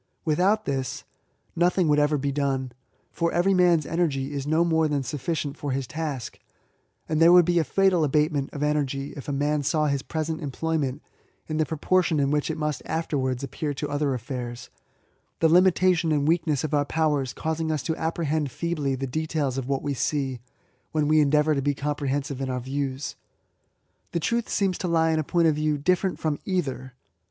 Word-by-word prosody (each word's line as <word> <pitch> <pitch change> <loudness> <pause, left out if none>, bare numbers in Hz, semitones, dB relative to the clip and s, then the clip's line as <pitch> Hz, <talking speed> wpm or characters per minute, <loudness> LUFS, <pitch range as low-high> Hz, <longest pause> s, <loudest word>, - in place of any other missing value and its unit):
Without 190 +7 +2
this, 135 -2 -3 0.5
nothing 175 +1 +2
would 150 -1 +4
ever 150 0 +2
be 140 0 -1
done; 135 -2 -1 0.4
for 170 0 0
every 175 +3 +2
man's 175 -4 +4
energy 145 -5 -1
is 140 0 -4
no 160 +3 +3
more 160 -1 +2
than 145 -2 -1
sufficient 145 +2 -3
for 145 - -3
his 135 0 -2
task; 145 -3 -5 0.7
and 155 0 0
there 165 +1 +8
would 175 -1 +7
be 175 0 +2
a - - +2
fatal 185 +2 +2
abatement 150 -1 +1
of 145 - -4
energy, 140 -2 -1
if 140 - -9
a - - 0
man 145 +1 0
saw 155 +2 +1
his 140 -2 0
present 160 +2 -3
employment 145 -1 -2 0.4
in 155 - -3
the 155 - +1
proportion 160 0 +1
in 140 0 +1
which 150 +1 0
it 160 - -2
must 150 -2 -2
afterwards 140 -5 -1
appear 145 +2 -3
to 150 - -3
other 145 -2 0
affairs, 125 0 -6 0.3
— - - -43
the 165 - +4
limitation 180 -1 +4
and 145 -1 +1
weakness 160 -4 +1
of 155 - -3
our 145 -1 +3
powers 145 -3 0
causing 160 +2 -2
us 155 -4 -2
to 160 - -1
apprehend 160 -3 -1
feebly 150 -1 -2
the 130 - -6
72 - - +1
ESSAYS. 155 +5 -1
details 150 -5 -1
of 130 - -5
what 135 -1 -1
we 145 -1 -1
see, 135 -1 -1 0.5
when 155 -2 +1
we 155 +1 +4
endeavour 150 +1 +3
to 140 - 0
be 145 +1 0
comprehensive 140 -1 -2
in 135 - -2
our 125 0 -1
views. 135 +1 -3 1.0
The 170 - +1
truth 235 +7 -1
seems 195 -3 0
to 180 - -2
lie 165 -1 +3
in 160 - +1
a - - 0
point 170 +2 +2
of 155 - +4
view 150 0 0
different 180 +5 +1
from 155 -2 -2
either. 135 -9 -3
150 Hz, 200 wpm, -25 LUFS, 140-160 Hz, 1.0 s, there